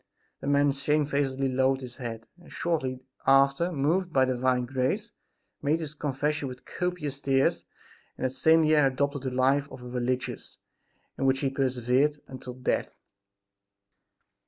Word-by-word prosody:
The - - -6
man 145 0 +4
shamefacedly 140 -1 0
lowered 130 +1 +2
his 125 -1 -8
head 115 -3 -6
and, 175 - -16
shortly 130 -7 -2 0.2
after, 135 +5 +4
moved 170 +5 0
by 130 -4 +4
divine 125 -1 +1
grace, 135 - -1 0.5
made 150 +3 +1
his 155 -3 -5
confession 150 0 -2
with 125 -1 -9
copious 155 -6 -3
tears 135 -1 +1 0.5
and - - -2
that 130 - 0
same 160 +5 +4
year 155 -2 +5
adopted 140 +1 -1
the 130 - -2
life 135 +3 +2
of 125 - -10
a - - -8
religious, 125 +1 -3 0.6
in 135 - +2
which 135 0 +2
he 135 -2 0
persevered 135 +2 +1
until 130 -1 -8
death. 125 0 -1
135 Hz, 145 wpm, -28 LUFS, 130-150 Hz, 0.6 s, year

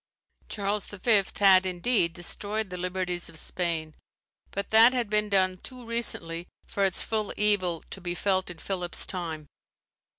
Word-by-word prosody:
Charles 205 -1 -2
V. 205 +1 +3 0.2
had, 190 -2 +6
indeed, 185 0 +1
destroyed 205 +4 -2
the 180 - -5
liberties 180 -1 -3
of 165 - -13
Spain; 160 -2 -2 0.6
but 200 - -5
that 225 +3 +7
had 240 -4 -2
been 210 0 +2
done 185 -2 +2
too 250 +5 -10
recently 175 -8 +2 0.2
for 200 - -2
its 190 - 0
full 215 -2 -2
evil 185 -5 +1
to 195 - -8
be 175 0 -4
felt 190 -1 0
in 175 - -9
Philip's 180 -1 -1
time. 165 -4 -5
190 Hz, 155 wpm, -27 LUFS, 175-210 Hz, 0.6 s, that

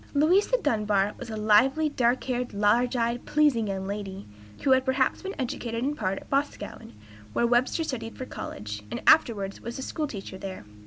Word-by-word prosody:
Louisa 365 +11 +4
Dunbar 210 - +1
was - - -7
a 220 - -4
lively, 240 +9 +4
dark 250 -3 +1
haired, 250 -3 -3
large 230 +5 +3
eyed, 235 0 0
pleasing 290 -8 +3
young 190 -1 -3
lady, 200 -1 -5 0.4
who 270 - +3
had 260 0 +5
perhaps 260 0 +1
been 390 +1 -5
educated 240 -3 -3
in 290 +2 0
part 190 -8 -1
at - - -10
Boscawen, 280 - -3 0.4
where 235 - +2
Webster 245 +7 +2
studied 230 -7 -5
for 255 - -5
college, 105 - -6
and - - -5
afterwards 200 -10 +4
was 235 - -6
a 265 - -5
school 305 +2 -3
teacher 195 -6 -8
there. 190 - -7
235 Hz, 180 wpm, -27 LUFS, 205-270 Hz, 0.4 s, had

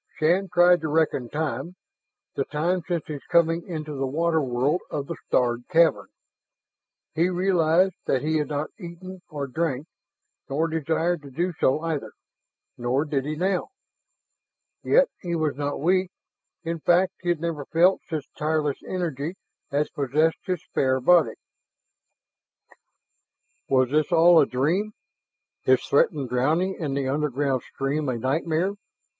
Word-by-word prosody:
Shann 180 +5 +2
tried 175 0 +5
to 160 - -2
reckon 150 -5 +1
time, 150 +3 -3 0.6
the 135 - -1
time 170 +5 -1
since 175 -3 -2
his 150 -3 -7
coming 165 0 +3
into 155 -4 -5
the 135 -1 -2
water 160 +3 +1
world 135 +6 0
of 145 -2 -3
the - - -5
starred 120 -1 +1
cavern. 165 0 +3 1.1
He 170 +3 +2
realized 180 0 +2
that 130 - +1
he 155 +1 +1
had 150 - -1
not 150 0 -3
eaten, 185 +1 -9
nor 145 -2 -3
drank, 140 0 -2 0.6
nor 155 +4 0
desired 160 +1 -1
to 140 - -11
do 175 +7 -2
so 135 +4 +2
either 160 -4 -3 0.7
nor 125 +5 0
did 140 -3 -1
he 155 +1 -3
now. 185 - -1 1.1
Yet - - +4
he 170 -1 -2
was 155 -4 0
not 145 0 -3
weak; 185 +4 +2 0.5
in 165 0 -3
fact, 175 +3 +3
he 175 - -3
had 175 -3 +1
never 160 -3 -3
felt 175 +6 +3
such 155 -3 -3
tireless 150 -2 -1
energy 170 -2 -3 0.4
as 145 +2 0
possessed 150 +4 +1
his 180 -3 -2
spare 130 -1 0
body. 170 +4 +4 2.3
Was 130 -1 +3
this 150 0 +1
all 170 +1 +7
a 145 - +4
dream? 170 +12 0 0.7
His 130 0 +3
threatened 140 -1 +2
drowning 155 +10 +1
in 145 -5 -2
the 140 -1 -1
underground 140 -2 0
stream 140 +3 -2
a 125 - -1
nightmare? 160 - 0
155 Hz, 145 wpm, -25 LUFS, 140-170 Hz, 2.3 s, all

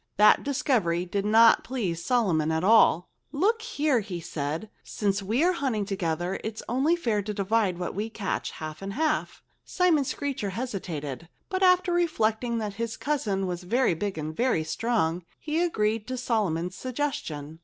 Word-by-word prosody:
That 210 +1 +6
discovery 220 - 0
did 200 +3 -2
not 225 +2 +6
please 190 -10 -3
Solomon 175 -11 +2
at 160 +1 0
all. 190 -4 +5 0.2
"Look 420 +10 +1
here!" 300 - +1
he 195 -5 -5
said. 155 +4 -4 0.2
"Since 200 -1 -1
we 220 +9 +1
are 360 - +4
hunting 255 - -1
together 180 -2 -2
it's 220 0 -5
only 270 +8 +2
fair 230 -11 0
to 210 +1 -5
divide 200 -2 +1
what 175 -1 -4
we 210 +4 -3
catch, 210 -3 -3
half 155 +1 -7
and 195 0 -5
half." 305 +3 -1 0.2
Simon 350 -6 +2
Screecher 270 -6 -3
hesitated. 170 - -5 0.2
But 375 -1 -2
after 365 -1 +4
reflecting 235 -9 +1
that 210 -3 -3
his 230 -1 -3
cousin 215 -10 -1
was 180 -1 -3
very 230 +3 +2
big 190 +2 -3
and 155 0 -4
very 240 -9 +1
strong, 175 -1 0 0.2
he 315 +2 -1
agreed 220 -10 0
to 255 0 -3
Solomon's 190 -8 -1
suggestion. 170 - -4
215 Hz, 165 wpm, -27 LUFS, 180-260 Hz, 0.2 s, That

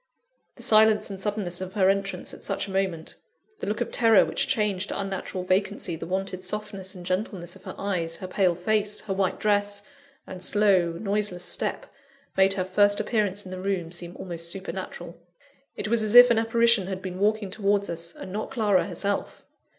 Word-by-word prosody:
The - - -6
silence 215 -1 +4
and 195 -1 -7
suddenness 195 -4 -2
of 185 0 -6
her 195 -3 +3
entrance 195 -2 -1
at - - -10
such 200 - -2
a - - -7
moment; 190 -4 -2 0.5
the - - -5
look 210 +3 -2
of 240 - -2
terror 225 -4 +5
which - - 0
changed 205 -4 0
to - - -3
unnatural 190 -1 -4
vacancy 185 -1 0
the 165 - -7
wonted 185 0 -3
softness 195 -1 -4
and 180 -1 -10
gentleness 185 -2 -3
of - - -17
her - - -7
eyes, 175 -5 -2
her 185 - -7
pale 185 -1 +2
face, 210 +3 0
her 205 -3 -3
white 190 -1 0
dress, 205 -1 +1 0.4
and 185 -1 -9
slow, 190 -5 +3
noiseless 200 -1 -2
step, - - -2 0.5
made 195 0 +4
her 185 -2 -1
first 205 +2 +3
appearance 205 -3 0
in 185 - -9
the 185 0 -6
room 185 -4 -2
seem 175 0 -6
almost 170 -2 -5
supernatural; 195 +2 -6 0.5
it - - -3
was 230 +1 +2
as 215 +1 0
if 245 0 +10
an 225 - +4
apparition 230 -3 +3
had 190 -1 -5
been 185 -1 -5
walking 210 -1 +1
towards 200 0 +1
us, 170 0 -4
and 185 - -8
not 215 +1 -3
Clara 210 -8 +2
herself! 200 0 -3
195 Hz, 190 wpm, -26 LUFS, 185-210 Hz, 0.5 s, if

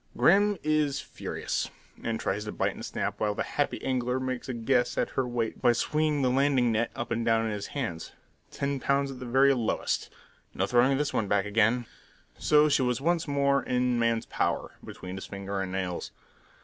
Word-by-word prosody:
Grim 205 +3 +4
is 150 -2 +1
furious, - - -4 0.3
and 115 -1 -2
tries 100 +2 -1
to 105 - -4
bite - - 0
and - - -9
snap - - -3
while 105 -1 0
the - - -1
happy - - -1
angler 125 -1 0
makes 130 0 -4
a - - -1
guess 120 +2 +1
at - - 0
her 130 - -1
weight 120 -2 -2
by 120 - +5
swinging 150 +3 +1
the 125 - +3
landing 130 -2 +3
net 115 +1 +1
up 120 - -5
and 115 +1 0
down 115 -1 +2
in 110 - -1
his 105 -1 -4
hands. 115 - -4 0.4
Ten 140 0 -2
pounds 140 +1 +1
at 130 - -9
the 125 - -6
very 135 +3 +5
lowest! 120 -4 -1 0.5
No 95 - +1
throwing 125 +5 +3
this 145 0 -1
one 105 - 0
back 100 0 +2
again! 110 +4 +2 0.5
So 150 0 +5
she 140 - +3
was 125 -2 +1
once 165 +3 +1
more 140 -1 +2
in 125 -1 0
man's 115 -1 +1
power, - - -1
between 90 +1 -8
his 95 - -7
fingers 100 0 -4
and 95 -1 -4
nails. 95 -2 -3
125 Hz, 200 wpm, -28 LUFS, 110-140 Hz, 0.5 s, by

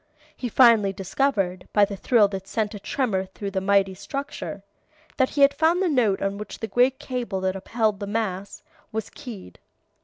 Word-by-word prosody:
He 245 - -4
finally 230 -4 +5
discovered, 195 -2 -1
by 205 -1 +5
the 200 0 -6
thrill 210 +2 +4
that 195 -1 -6
sent 215 0 -1
a 205 - -7
tremor 205 -3 -1
through 195 +1 -6
the 190 -1 -1
mighty 195 0 +3
structure, 275 +9 -6 0.5
that 260 -1 +3
he 285 - -2
had 280 0 +7
found 325 +3 +2
the 380 - +2
note 230 -10 +2
on 195 +1 -2
which 210 - -7
the - - -4
great 250 +3 +2
cable 245 -7 -3
that 190 0 0
upheld 215 +1 -1
the 200 - -4
mass, 200 -2 -3 0.3
was 220 -1 -4
keyed. 205 - -10
210 Hz, 185 wpm, -24 LUFS, 195-250 Hz, 0.5 s, had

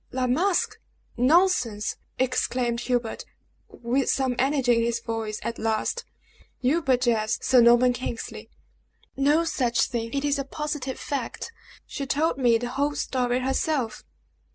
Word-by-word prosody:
"La 255 0 -1
Masque! 340 +9 +1 0.4
Nonsense!" 250 - +2 0.2
exclaimed 250 -2 0
Hubert, 240 -2 -2 0.4
with 245 +3 -1
some 260 -2 +1
energy 265 -3 +2
in - - +2
his 235 0 0
voice 225 -2 -4
at 230 - -4
last. 225 - -1 0.5
"You 280 +7 +2
but 260 -4 +2
jest, 225 -3 +1
Sir 255 -2 +5
Norman 240 +1 +5
Kingsley!" 245 -1 -6 0.7
"No 290 +4 +3
such 250 -7 +1
thing! 230 -1 -3
It 280 0 -1
is 285 0 +1
a - - -1
positive 295 -1 -4
fact! 275 - -4 0.3
She 275 - -5
told 290 -1 0
me 240 -3 +4
the 240 +1 -4
whole 285 +3 -1
story 250 -1 0
herself!" 265 -2 -1
255 Hz, 140 wpm, -25 LUFS, 235-280 Hz, 0.7 s, Sir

